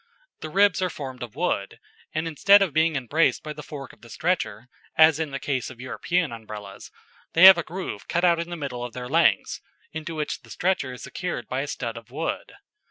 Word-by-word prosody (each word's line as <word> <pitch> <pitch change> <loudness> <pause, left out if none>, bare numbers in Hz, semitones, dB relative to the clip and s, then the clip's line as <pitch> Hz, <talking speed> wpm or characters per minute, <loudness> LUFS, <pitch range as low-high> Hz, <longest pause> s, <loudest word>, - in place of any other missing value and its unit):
The 155 - -6
ribs 200 +2 +3
are 185 - +1
formed 130 -5 -7
of 120 -1 -7
wood; 145 - -2 0.3
and 155 +1 -2
instead 195 +6 +5
of 175 -7 -3
being 160 +1 +2
embraced 145 +5 +1
by 150 - -5
the 150 - -9
fork 140 -4 -9
of - - -21
the 115 - -14
stretcher, 125 - -2 0.3
as 155 -1 +6
in 160 -2 -1
the 135 - -4
case 130 -4 -2
of 130 -2 -12
European 165 +5 -1
Umbrellas, 105 -3 -9 0.4
they 165 - +4
have 190 -2 +11
a - - -2
groove 175 - -6
cut 175 +1 +1
out 170 -1 +4
in 170 +1 -4
the 175 - -5
middle 130 -5 -5
of 120 -1 -6
their 125 -1 -6
lengths, 165 +5 +2 0.3
into 160 +1 -6
which 150 -2 -3
the 120 - -19
stretcher 145 - -1
is 125 - -10
secured 175 - -5
by 130 +1 -2
a 145 - -4
stud 115 -4 -4
of 115 -2 -11
wood. 150 +6 -4
150 Hz, 220 wpm, -25 LUFS, 125-170 Hz, 0.4 s, have